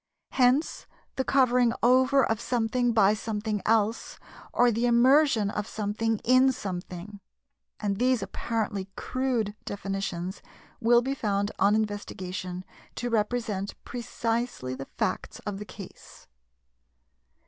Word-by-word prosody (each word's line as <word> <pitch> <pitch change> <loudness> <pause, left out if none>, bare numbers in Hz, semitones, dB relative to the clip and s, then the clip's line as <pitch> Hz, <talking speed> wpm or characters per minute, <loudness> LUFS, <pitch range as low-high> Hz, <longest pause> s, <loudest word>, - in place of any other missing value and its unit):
Hence 260 +4 +2 0.3
the 265 - 0
covering 250 -3 +3
over 260 +2 +5
of 220 -1 -1
something 245 0 0
by 210 -3 +4
something 215 -1 -3
else, 220 +1 +1 0.3
or 245 0 +4
the 230 +2 +1
immersion 240 -3 +4
of 210 0 -3
something 220 +1 -1
in 255 +2 +5
something; 185 0 -6 0.6
and 200 -2 -1
these 255 -1 +2
apparently 205 -4 -3
crude 250 -5 -1
definitions 195 -2 -4 0.4
will 240 +1 +4
be 270 +2 -1
found 205 -5 -1
on 200 +2 +4
investigation 185 -4 -4 0.3
to 245 -1 -3
represent 210 -3 -1
precisely 230 - -3
the 135 +1 -6
facts 220 -5 -3
of 205 -2 -4
the 210 - -6
case. 195 -2 -12
220 Hz, 115 wpm, -27 LUFS, 200-245 Hz, 0.6 s, over